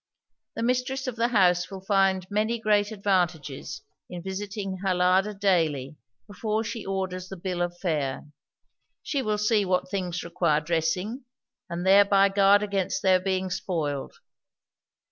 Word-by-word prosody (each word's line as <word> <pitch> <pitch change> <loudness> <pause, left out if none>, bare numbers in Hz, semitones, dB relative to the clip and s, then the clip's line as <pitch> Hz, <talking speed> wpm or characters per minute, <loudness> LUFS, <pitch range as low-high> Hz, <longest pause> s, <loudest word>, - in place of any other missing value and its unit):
The - - -3
mistress 255 +2 0
of 255 -3 -3
the 230 0 +1
house 180 -6 +3
will 190 -1 -9
find 195 -2 +2
many 215 +3 0
great 210 -1 +1
advantages 175 -8 -2 0.3
in 175 -1 -7
visiting 195 0 -4
her 185 -1 0
larder 185 +3 +3
daily 160 -8 +1 0.3
before 215 +2 -2
she 225 0 -5
orders 185 -1 -4
the 195 - -7
bill 180 0 -3
of 175 0 -2
fare; 150 -7 -2 0.8
she 280 - -1
will 215 -4 -1
see 210 0 +2
what 185 -1 -1
things 180 -3 -3
require 170 -3 +1
dressing, 175 - -2 0.4
and 170 +1 -4
thereby 200 0 +6
guard 200 +1 +4
against 200 -3 -2
their 185 -1 +5
being 185 0 -2
spoiled. 165 -7 -3
190 Hz, 145 wpm, -26 LUFS, 175-205 Hz, 0.8 s, thereby